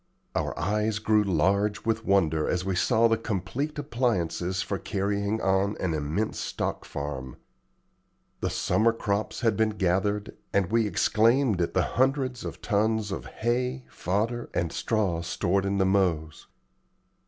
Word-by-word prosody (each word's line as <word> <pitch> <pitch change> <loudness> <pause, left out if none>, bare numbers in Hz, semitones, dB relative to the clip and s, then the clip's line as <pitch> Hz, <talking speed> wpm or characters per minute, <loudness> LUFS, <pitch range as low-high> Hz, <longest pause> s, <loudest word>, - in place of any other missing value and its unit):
Our - - -2
eyes 105 +6 0
grew 105 0 +3
large 100 +4 +1
with 115 0 0
wonder 80 -6 +2
as 90 0 0
we 95 -1 0
saw 115 +5 +4
the 115 0 +2
complete 115 - -3
appliances 95 - -1
for 100 +1 -3
carrying 100 +1 -1
on 95 +2 +1
an 90 -3 -1
immense 80 +8 -2
stock - - -3
farm. 70 -3 -5 1.0
The - - -1
summer 115 +1 +2
crops 105 -2 -2
had 115 -4 +2
been 110 +2 +2
gathered, 100 +3 0 0.2
and 100 -1 +1
we 115 -1 +3
exclaimed 110 +2 +3
at 85 - -1
the - - +4
hundreds 130 -1 0
of - - -7
tons 110 0 +1
of 95 - -5
hay, 125 +3 -1
fodder, 110 +7 -1
and 85 -1 0
straw 100 -7 0
stored 95 +3 0
in 100 0 0
the 95 - +3
mows. 85 -5 0
100 Hz, 145 wpm, -27 LUFS, 90-115 Hz, 1.0 s, saw